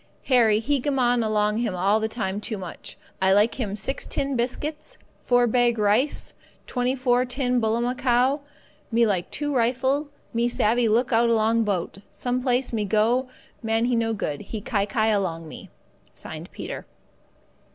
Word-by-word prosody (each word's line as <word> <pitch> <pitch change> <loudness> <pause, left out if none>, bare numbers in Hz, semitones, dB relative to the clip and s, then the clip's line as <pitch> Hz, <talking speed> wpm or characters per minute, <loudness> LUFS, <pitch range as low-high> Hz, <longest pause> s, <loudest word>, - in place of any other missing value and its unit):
"Harry 235 -5 +4
he 270 +6 0
gammon 250 -3 +1
along 215 0 +1
him 225 -6 -1
all 195 +4 +2
the 220 - -1
time 210 -3 -3
too 215 0 -3
much. 180 -3 -8 0.2
I 190 0 +4
like 210 +6 +3
him 205 -5 -2
6 215 +7 -3
tin 275 -1 -2
biscuit, 295 +6 -3 0.3
4 245 -1 +4
bag 240 0 +2
rice, 215 +7 +1 0.3
24 250 0 +1
tin 250 -1 0
bullamacow. 245 +4 +1 0.5
Me 230 +1 +4
like 190 -5 0
him - - -32 0.2
2 - - -2
rifle, 260 +4 +1 0.3
me 235 +1 +1
savvee 235 0 +2
look 235 +3 +2
out 235 +1 +4
along 225 0 +2
boat, 195 -2 -2
some 250 0 -2
place 250 -1 0
me 215 -2 0
go 225 +6 +1 0.3
man 225 0 +1
he 245 0 +1
no 230 -1 +1
good, 150 -9 -3
he 220 - -6
kai 205 -1 -1
kai 220 -2 +1
along 175 -6 -1
me. - - -10 0.8
"Peter." - - -7
235 Hz, 160 wpm, -24 LUFS, 215-250 Hz, 0.8 s, Harry